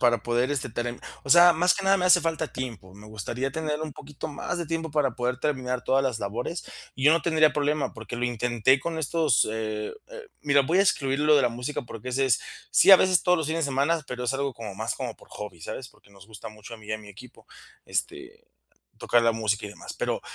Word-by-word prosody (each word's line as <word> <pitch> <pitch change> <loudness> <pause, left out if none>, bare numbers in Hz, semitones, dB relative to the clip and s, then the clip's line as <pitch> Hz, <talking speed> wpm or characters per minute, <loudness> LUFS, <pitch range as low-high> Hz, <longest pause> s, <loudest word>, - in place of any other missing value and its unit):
para 120 -2 +4
poder 120 +3 0
este 135 -2 -2
term 120 +1 -4 0.2
o 135 - -5
sea, 175 +2 +8
más 180 +3 +3
que 200 - -4
nada 195 0 +5
me 180 - -1
hace 180 0 +6
falta 160 -2 -2
tiempo. 115 -8 -7
Me 105 +1 -13
gustaría 115 +5 -4
tener 155 +1 -3
un 155 -1 -5
poquito 145 +2 -8
más 155 +4 -4
de 170 - -3
tiempo 165 0 -3
para 145 -4 +1
poder 125 +1 -1
terminar 130 -4 -2
todas 135 +1 +2
las 125 -4 -1
labores 115 - -4 0.3
y 130 - -4
yo 150 - +7
no 165 - +2
tendría 155 -2 +3
problema, 150 0 0
porque - - -7
lo 120 - -1
intenté 120 +2 +2
con 165 +3 -4
estos, 155 -4 +2
eh, 110 -1 -3 0.2
eh, - - -8 0.2
mira, 145 -1 +4
voy 165 +8 +1
a - - +6
excluir 135 -8 +1
lo 150 0 +5
de 145 - +5
la 125 - +3
música 125 +5 -4
porque 120 0 -8
ese 135 +2 +1
es 125 -5 +2 0.3
sí, - - +6
a - - +12
veces 185 -1 +3
todos 180 -1 +3
los 160 - -2
fines 165 0 0
de 140 - -2
semana, 140 +5 +1
pero 125 -1 -5
es 125 - 0
algo 140 0 -1
como 110 -4 -7
más 110 +2 -2
como 125 -4 -5
por - - -19
hobby, 100 -5 -8
¿sabes?, 125 +9 -7
porque - - -24
nos 100 -1 -17
gusta 110 0 -9
mucho 110 +2 -11
a - - -10
mí 110 -1 -16
y 110 - -4
a 110 - -2
mi 105 -1 -14
equipo, 105 +5 -14 0.4
este, 375 +6 -5 0.5
tocar 120 0 +2
la 115 - +4
música 110 -2 -1
y - - -7
demás. 105 - -9
Pero, - - -2
135 Hz, 250 wpm, -26 LUFS, 115-160 Hz, 0.5 s, a